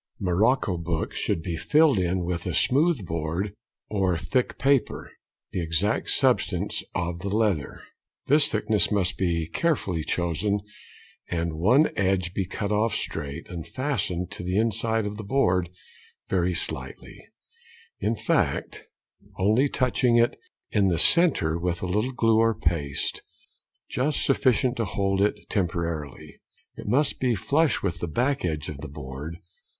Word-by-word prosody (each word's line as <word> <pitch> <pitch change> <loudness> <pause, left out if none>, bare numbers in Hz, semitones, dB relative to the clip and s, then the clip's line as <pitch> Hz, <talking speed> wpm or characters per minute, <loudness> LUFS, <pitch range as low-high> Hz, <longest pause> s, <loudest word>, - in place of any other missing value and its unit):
Morocco 100 +2 +2
books 85 -1 -3
should 80 - -1
be 85 -2 -3
filled 150 - +4
in 90 0 0
with 85 -1 -3
a - - -1
smooth 145 - +2
board 85 +5 -2 0.3
or 95 -4 +1
thick 95 +10 -1
paper, 135 -4 +1 0.4
the 90 - -2
exact 85 +5 0
substance - - +1
of 85 0 -2
the 100 +2 -4
leather. 105 -7 0 0.4
This 145 +1 +4
thickness 105 -3 +1
must 100 -4 +1
be 85 -3 0
carefully 95 - 0
chosen, 90 +6 -1 0.7
and 85 -1 -1
one 110 - +4
edge 95 -3 0
be 95 -2 -2
cut 100 +1 -3
off 105 +1 +1
straight, 80 -2 -4
and 85 -3 -7
fastened 95 - -2
to - - -7
the 90 +2 -1
inside 110 0 +1
of 105 0 -4
the 110 - -6
board 90 -7 +1 0.6
very 90 -1 +1
slightly, - - -5 0.8
in 110 +4 0
fact - - -1 0.5
only 110 +9 +3
touching 125 -2 +2
it 120 0 +4 0.4
in 100 -2 +3
the 85 -3 +1
centre 85 - +3
with 85 0 -2
a - - 0
little 105 +8 0
glue 115 -3 +3
or 115 0 +3
paste, 75 -4 -1 0.7
just 135 +4 0
sufficient 130 -2 +2
to 115 - 0
hold 95 0 0
it 105 0 0
temporarily. 85 -6 -3 0.3
It - - -9
must 135 +7 +1
be 125 -3 +2
|98| - - -4
flush 140 +10 +1
with 85 -4 -2
the 85 - -3
back 130 - 0
edge 80 -4 -2
of 75 - -6
the - - -6
board. 70 +3 -7
95 Hz, 150 wpm, -26 LUFS, 85-115 Hz, 0.8 s, filled